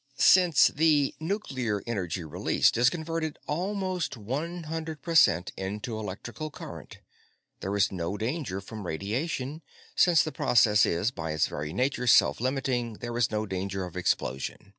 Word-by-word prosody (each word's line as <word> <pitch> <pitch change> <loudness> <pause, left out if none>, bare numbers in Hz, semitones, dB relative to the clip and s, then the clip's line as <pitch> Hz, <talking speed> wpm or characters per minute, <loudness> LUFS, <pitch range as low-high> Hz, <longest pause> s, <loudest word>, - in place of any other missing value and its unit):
"Since 180 -6 +6
the 150 -2 +2
nuclear 130 - -2
energy 95 -6 -3
released 80 - +1
is 120 +2 +5
converted 160 0 -3
almost 185 -2 -2
one 150 +11 -4
hundred 160 -2 -5
per 170 - -3
cent 90 - +4
into 105 +5 -4
electrical 110 +9 -6
current, - - -10 0.6
there 95 +2 -3
is 100 -1 +2
no 90 +1 -3
danger 110 - -3
from 105 -1 -8
radiation; 130 - -3 0.3
since 175 -3 +5
the 155 - -4
process 115 -8 +4
is, 90 +8 0
by 80 -8 -4
its 80 - +2
very 75 +1 -5
nature, 125 - -1
self 115 - +5
limiting, 130 -3 -1
there 120 +2 -6
is 120 -3 +2
no 110 0 -1
danger 95 -1 -3
of 90 - -10
explosion. 65 +1 -2
120 Hz, 150 wpm, -28 LUFS, 100-155 Hz, 0.6 s, Since